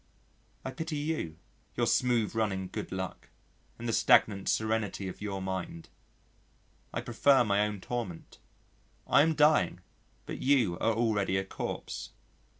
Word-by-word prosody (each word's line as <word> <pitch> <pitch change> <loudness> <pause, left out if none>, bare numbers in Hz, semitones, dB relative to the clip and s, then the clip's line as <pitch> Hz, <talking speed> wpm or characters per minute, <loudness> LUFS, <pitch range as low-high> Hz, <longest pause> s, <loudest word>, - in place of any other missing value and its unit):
I 130 - -3
pity 160 +4 -4
you 145 - -3 0.4
your - - +1
smooth 120 -4 +2
running 100 -4 -1
good - - -5
luck 95 -1 -5 0.5
and 120 - -6
the 115 - 0
stagnant 105 -2 +4
serenity 110 -3 0
of 90 - -8
your 100 -2 -3
mind. 95 -3 -5 1.0
I - - -3
prefer 140 -3 +4
my 100 -2 +1
own 105 -2 -6
torment. 115 -9 -5 0.7
I - - +5
am 160 +1 +3
dying, 150 +1 +3 0.4
but - - -6
you 130 -9 +3
are 115 0 +2
already 105 -4 +1
a 95 - -1
corpse. - - -5
110 Hz, 140 wpm, -30 LUFS, 95-125 Hz, 1.0 s, I